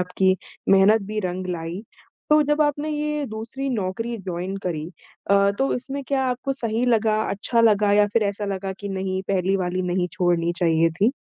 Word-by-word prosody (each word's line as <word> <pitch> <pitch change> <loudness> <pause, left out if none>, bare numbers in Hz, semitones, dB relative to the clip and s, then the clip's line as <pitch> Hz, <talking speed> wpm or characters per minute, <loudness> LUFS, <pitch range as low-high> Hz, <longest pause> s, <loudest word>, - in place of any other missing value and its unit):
आपकी 185 +1 +1 0.3
मेहनत 200 +3 +5
भी 215 0 -4
रंग 185 -1 -3
लाई। 175 +2 -4 0.5
तो 300 0 +6
जब 295 +1 +2
आपने 295 +1 -1
ये 300 0 -2
दूसरी 230 +5 -5
नौकरी 225 +1 -2
जॉइन 185 +1 -4
करी 160 -4 -3 0.4
अ, 200 0 +5
तो 270 - +1
इसमें 275 +3 -4
क्या 275 -1 0
आपको 255 +2 -1
सही 230 -2 -1
लगा? 220 -2 +2
अच्छा 215 +4 +1
लगा? 210 -2 +4
या 205 0 +5
फिर 230 - +3
ऐसा 205 0 -2
लगा 195 -1 -3
कि 205 - -5
नहीं 190 -1 -2
पहली 190 0 +1
वाली 185 0 -1
नहीं 180 0 0
छोड़नी 175 -1 +1
चाहिए 165 -1 +3
थी? 200 +8 +2
200 Hz, 180 wpm, -23 LUFS, 185-235 Hz, 0.5 s, तो